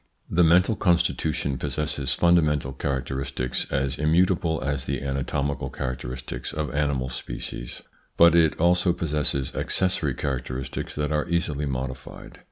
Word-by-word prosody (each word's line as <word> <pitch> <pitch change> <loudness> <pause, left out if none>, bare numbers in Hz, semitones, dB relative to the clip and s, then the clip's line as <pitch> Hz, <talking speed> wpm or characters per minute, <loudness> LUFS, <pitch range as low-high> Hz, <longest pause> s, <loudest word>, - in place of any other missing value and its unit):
The 90 - +4
mental 90 +6 +5
constitution 85 -7 +1
possesses 75 -3 -2
fundamental 75 -6 +3
characteristics 65 -1 -2
as 70 -1 -1
immutable 85 +1 +2
as 70 -2 -2
the - - -2
anatomical 70 +1 -2
characteristics 65 -1 -5
of 75 -2 -3
animal 70 -3 0
species, - - -5 0.3
but 85 -1 +7
it 80 -2 +3
also 90 +1 +3
possesses 75 -5 -1
accessory 85 -7 +1
characteristics 65 0 -4
that 75 0 -1
are 75 +2 0
easily 75 -4 0
modified. 65 0 -6
70 Hz, 120 wpm, -25 LUFS, 65-85 Hz, 0.3 s, but